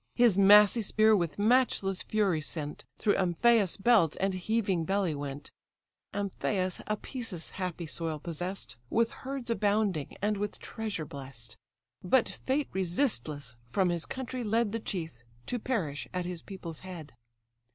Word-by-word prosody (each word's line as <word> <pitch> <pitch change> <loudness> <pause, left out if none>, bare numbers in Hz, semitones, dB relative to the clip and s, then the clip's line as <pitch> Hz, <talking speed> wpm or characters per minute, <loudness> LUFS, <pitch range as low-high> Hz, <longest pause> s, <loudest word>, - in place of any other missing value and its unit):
His 240 -5 +5
massy 205 +3 +7
spear 215 +1 +4
with 170 -6 -1
matchless 205 -4 +2
fury 195 -7 +1
sent, 150 0 -4
Through 205 - +2
Amphius' 195 +2 +3
belt 200 -7 +4
and 195 0 +1
heaving 190 -2 0
belly 190 -1 +1
went; 145 0 -6 0.6
Amphius 195 -2 -2
Apæsus' 215 -4 -4
happy 180 -2 -4
soil 160 0 -3
possess'd, 170 - -5
With 230 0 +2
herds 265 -3 -5
abounding, 205 -8 0
and 210 +1 0
with 205 0 -3
treasure 215 -8 -4
bless'd; 130 -6 -9 0.5
But 225 +7 +4
fate 275 +2 -1
resistless 165 - -1
from 185 +8 +2
his 170 -1 -1
country 255 -1 -4
led 225 0 +1
The 230 - -2
chief, 165 - -5 0.2
to 245 - -2
perish 175 - -2
at 180 -1 -1
his 175 -2 -4
people's 170 -5 -7
head. 175 -7 -9
190 Hz, 140 wpm, -30 LUFS, 165-220 Hz, 0.6 s, massy